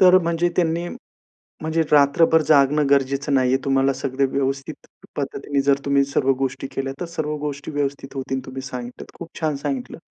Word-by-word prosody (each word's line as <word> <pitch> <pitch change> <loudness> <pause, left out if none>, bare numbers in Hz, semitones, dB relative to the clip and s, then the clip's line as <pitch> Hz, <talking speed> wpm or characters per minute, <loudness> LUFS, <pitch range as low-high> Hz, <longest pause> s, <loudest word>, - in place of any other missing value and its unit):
तर 185 0 +8
म्हणजे 170 +1 +1
त्यांनी 170 0 +1 0.8
म्हणजे 160 +1 0
रात्रभर 150 +3 +5
जागणं 150 0 +4
गरजेचं 140 +1 +1
नाहीये, 130 -1 +3
तुम्हाला 135 0 +2
सगळं 130 +1 -1
व्यवस्थित 135 +2 -3 0.3
पद्धतीने 140 0 -2
जर 140 0 +2
तुम्ही 140 0 +3
सर्व 135 -1 +1
गोष्टी 135 0 -2
केल्या, 135 0 -3
तर 175 - -3
सर्व 155 -2 -3
गोष्टी 145 0 -5
व्यवस्थित 140 -1 -3
होतील. 135 0 -2
तुम्ही 130 0 -6
सांगितल्या, 125 -2 -8
खूप 170 - -8
छान 155 -3 0
सांगितलं. 140 -3 -4
140 Hz, 160 wpm, -22 LUFS, 135-155 Hz, 0.8 s, तर